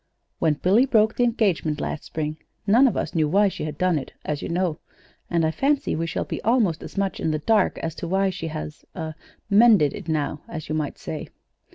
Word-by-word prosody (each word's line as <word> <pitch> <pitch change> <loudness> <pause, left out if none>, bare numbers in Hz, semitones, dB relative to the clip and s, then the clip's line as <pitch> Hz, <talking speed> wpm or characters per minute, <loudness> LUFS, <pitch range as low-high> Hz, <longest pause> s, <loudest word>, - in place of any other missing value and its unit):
When 160 -2 +2
Billy 205 - +3
broke 220 -3 +4
the 245 - +2
engagement 195 -10 +1
last 150 - -4
spring 155 -1 -3 0.3
none 235 +7 +6
of 240 - 0
us - - -2
knew 155 -3 +2
why 200 +4 +4
she 185 - -5
had 155 -1 -5
done 180 -3 +2
it, 135 - -9
as 150 -1 -2
you - - -4
know; 175 -2 0 0.5
and 170 -2 +2
I 160 - +1
fancy 275 - +1
we 165 +1 -2
shall - - -2
be - - -5
almost 220 -8 +2
as - - -10
much 195 -1 -1
in - - 0
the 155 - 0
dark 210 +5 +2
as 165 - -3
to 170 - -4
why 190 +2 +2
she 170 -3 -5
has 155 -1 -6
er 160 -2 -4 0.3
mended 205 - +5
it - - -8
now, 150 -1 -1
as 155 -3 -6
you - - -1
might 155 -2 -2
say. - - -6
170 Hz, 225 wpm, -24 LUFS, 155-210 Hz, 0.5 s, none